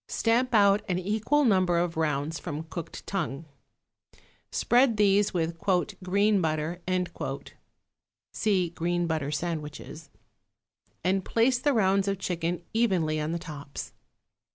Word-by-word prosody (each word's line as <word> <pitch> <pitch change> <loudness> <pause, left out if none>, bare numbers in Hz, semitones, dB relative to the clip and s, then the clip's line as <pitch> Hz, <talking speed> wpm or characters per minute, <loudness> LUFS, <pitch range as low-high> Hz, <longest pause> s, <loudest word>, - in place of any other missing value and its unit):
Stamp 240 +2 +1
out 200 0 +5
an 180 - +1
equal 220 +10 +1
number 185 -6 +3
of 170 -1 0
rounds 155 0 -1
from 155 -2 -5
cooked 165 +1 -8
tongue. 165 -6 -3 1.1
Spread 240 -2 +3
these 205 0 +4
with 165 -1 -2 0.4
"green 200 +2 +2
butter" 160 +2 -2 1.5
(see 190 -6 +1
Green 175 +1 -1
Butter 160 -4 -1
Sandwiches) 155 -1 -5 0.9
and 190 +2 +1
place 240 +5 +2
the 285 +2 +2
rounds 195 -3 +2
of 200 0 0
chicken 175 -2 -2
evenly 185 -9 +1
on 150 +1 -2
the 170 - -1
tops. 150 -5 -8
180 Hz, 120 wpm, -27 LUFS, 160-205 Hz, 1.5 s, out